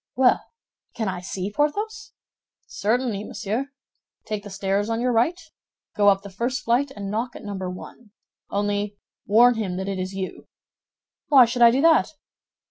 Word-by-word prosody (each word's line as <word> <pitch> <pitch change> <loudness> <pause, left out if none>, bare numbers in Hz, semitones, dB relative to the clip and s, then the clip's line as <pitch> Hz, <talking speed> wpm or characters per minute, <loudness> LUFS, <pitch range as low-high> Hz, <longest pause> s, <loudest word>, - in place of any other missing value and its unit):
"Well, 255 -1 +4 0.5
can 220 -3 -2
I 185 -2 -3
see 190 +2 -4
Porthos?" 435 - -2 0.5
"Certainly, 220 0 -1
monsieur. 225 +4 -3 0.6
Take 215 -2 -4
the 205 - -9
stairs 195 +2 -1
on 225 0 -1
your 250 +1 +1
right; 245 +10 +2 0.6
go 205 -1 +3
up 195 0 +4
the 200 - -8
first 245 +6 -2
flight 245 +5 +2
and 200 -1 -5
knock 235 +3 -2
at - - -10
Number 190 -3 -4
One. 210 +5 -10 0.4
Only 205 0 -1 0.3
warn 240 +4 +6
him 190 -5 -2
that 190 +1 -4
it 195 -1 -3
is 185 +1 -4
you." 190 -1 -6 0.8
"Why 270 -4 +8
should 240 +1 -3
I 235 - +9
do 255 +4 +2
that?" 320 0 +4
215 Hz, 165 wpm, -24 LUFS, 200-250 Hz, 0.8 s, I